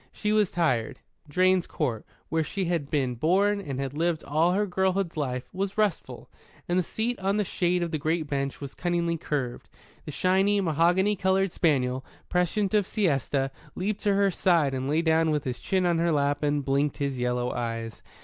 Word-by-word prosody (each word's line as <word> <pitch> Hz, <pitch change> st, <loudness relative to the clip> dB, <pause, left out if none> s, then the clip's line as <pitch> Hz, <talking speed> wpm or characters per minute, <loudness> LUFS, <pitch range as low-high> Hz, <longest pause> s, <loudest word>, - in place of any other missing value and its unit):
She 210 Hz, -, -2 dB
was 210 Hz, -3 st, +3 dB
tired; 130 Hz, -10 st, 0 dB, 0.3 s
Drane's 185 Hz, +3 st, +3 dB
Court, 120 Hz, -8 st, -3 dB, 0.2 s
where 160 Hz, 0 st, +1 dB
she 190 Hz, +4 st, -3 dB
had 165 Hz, -5 st, -1 dB
been 135 Hz, -4 st, 0 dB
born 195 Hz, -, +2 dB
and 135 Hz, -8 st, -5 dB
had 135 Hz, -1 st, -3 dB
lived 165 Hz, +1 st, 0 dB
all 160 Hz, +5 st, +2 dB
her 205 Hz, +2 st, +1 dB
girlhood's 190 Hz, -1 st, 0 dB
life, 125 Hz, -4 st, -3 dB
was 195 Hz, +2 st, -3 dB
restful; 210 Hz, -6 st, -1 dB, 0.4 s
and 175 Hz, +1 st, +2 dB
the -, -, +3 dB
seat 225 Hz, +7 st, -2 dB
in 195 Hz, +2 st, +1 dB
the 210 Hz, -, +2 dB
shade 180 Hz, -2 st, 0 dB
of 170 Hz, -, -3 dB
the 155 Hz, -, -1 dB
great 160 Hz, +1 st, -1 dB
beech 140 Hz, -1 st, -2 dB
was 140 Hz, -1 st, -7 dB
cunningly 170 Hz, -1 st, -1 dB
curved. 140 Hz, -6 st, -4 dB, 0.4 s
The -, -, -5 dB
shiny, 190 Hz, +6 st, +2 dB
mahogany 180 Hz, +4 st, +2 dB
coloured 190 Hz, 0 st, +1 dB
spaniel, 130 Hz, -6 st, +1 dB, 0.3 s
prescient 185 Hz, +3 st, 0 dB
of 205 Hz, -3 st, +3 dB
siesta, 140 Hz, -, 0 dB, 0.2 s
leaped 200 Hz, +2 st, -2 dB
to 205 Hz, -1 st, +2 dB
her 200 Hz, -1 st, +3 dB
side 165 Hz, -6 st, +2 dB
and 130 Hz, +1 st, -2 dB
lay 160 Hz, +3 st, +2 dB
down 160 Hz, 0 st, +3 dB
with 150 Hz, -2 st, 0 dB
his 125 Hz, -2 st, -4 dB
chin 190 Hz, -1 st, 0 dB
on 170 Hz, -2 st, +2 dB
her 170 Hz, 0 st, +2 dB
lap 145 Hz, -1 st, +1 dB
and 145 Hz, -1 st, 0 dB
blinked 140 Hz, +1 st, +1 dB
his 140 Hz, -3 st, -2 dB
yellow 125 Hz, 0 st, 0 dB
eyes. 115 Hz, -2 st, -4 dB
165 Hz, 190 wpm, -27 LUFS, 140-190 Hz, 0.4 s, was